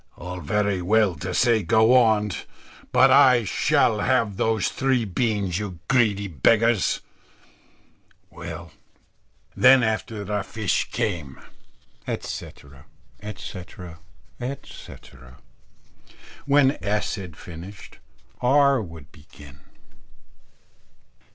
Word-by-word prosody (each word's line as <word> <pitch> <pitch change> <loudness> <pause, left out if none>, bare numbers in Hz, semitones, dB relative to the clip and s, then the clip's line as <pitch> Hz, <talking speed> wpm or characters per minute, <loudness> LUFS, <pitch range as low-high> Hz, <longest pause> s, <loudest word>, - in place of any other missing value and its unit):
_ - - -38 0.2
"All 90 +1 -7
very 100 0 -1
well 105 +1 +2
to 95 0 -5
say 115 +3 +2
go 110 +6 +3
on; 110 -4 +3 0.6
but - - +5
I 125 -3 +6
shall 105 +1 +1
have 115 -5 +1
those 110 0 0
three 130 -3 0
beans, 100 -3 -1
you 100 -4 -6
greedy 105 -6 +2
beggars. 110 - +2 1.3
Well, 85 -1 -9 0.8
then, 130 -2 +6
after 110 -1 -2
the 105 +1 -2
fish 110 0 -2
came 80 -10 -3 0.4
" - - -35
etc., 70 -1 -7 0.3
etc., 90 -4 -9 0.4
etc. 70 - -10 1.1
When 140 0 +3
S. 105 +1 -1
had 90 -7 -8
finished, 90 +4 -11 0.4
R. 140 0 +4
would 80 -7 -11
begin. 75 -2 -16
105 Hz, 100 wpm, -23 LUFS, 90-115 Hz, 1.3 s, I